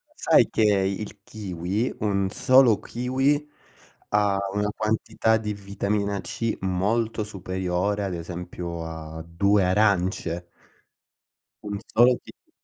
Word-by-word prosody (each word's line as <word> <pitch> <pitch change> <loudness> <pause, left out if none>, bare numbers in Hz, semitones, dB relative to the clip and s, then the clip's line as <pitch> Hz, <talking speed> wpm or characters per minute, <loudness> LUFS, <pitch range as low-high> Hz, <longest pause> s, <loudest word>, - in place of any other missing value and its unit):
sai - - +4
che - - -1
il 100 0 0
kiwi, 100 +2 -3
1 100 -2 0
solo 130 -1 +5
kiwi, 135 +5 0 0.6
ha 105 -1 +2 0.2
una 105 +1 0
quantità 110 +1 +1
di 105 -1 -3
vitamina 100 0 -2
C 115 -1 -3
molto 105 +4 0
superiore, 95 0 -2
ad 95 -2 -2
esempio 85 0 -6
a 80 0 -7
2 100 +3 +2
arance? 90 -3 +1 1.2
1 100 -1 -4
solo 120 +2 +6
kiwi - - -17
100 Hz, 110 wpm, -25 LUFS, 90-110 Hz, 1.2 s, solo